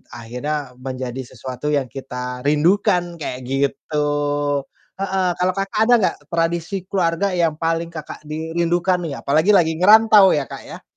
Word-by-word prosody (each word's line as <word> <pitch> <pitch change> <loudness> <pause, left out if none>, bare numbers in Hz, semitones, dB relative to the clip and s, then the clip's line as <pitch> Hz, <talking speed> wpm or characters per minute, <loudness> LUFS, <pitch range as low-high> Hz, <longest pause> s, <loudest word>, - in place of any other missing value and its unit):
akhirnya 125 +3 -5
menjadi 130 0 -5
sesuatu 130 +3 -5
yang 140 -3 0
kita 125 -1 -6
rindukan, 175 +3 +2
kayak 125 -4 -4
gitu. 140 +2 -1 1.0
Heeh, 190 -1 0
kalau 180 +1 +1
Kakak, 195 +2 -2
ada 245 - +2
nggak 190 - +1
tradisi 170 +2 -1
keluarga 185 0 0
yang 165 -3 +1
paling 165 0 -1
Kakak 155 -3 -8
di 160 +2 -6
rindukan 175 +2 +1
nih, 155 -5 -4
apalagi 155 +8 +2
lagi 175 -6 +4
ngerantau 210 0 +7
ya, 145 -2 0
Kak, - - -8
ya? - - -10
165 Hz, 150 wpm, -20 LUFS, 140-180 Hz, 1.0 s, ngerantau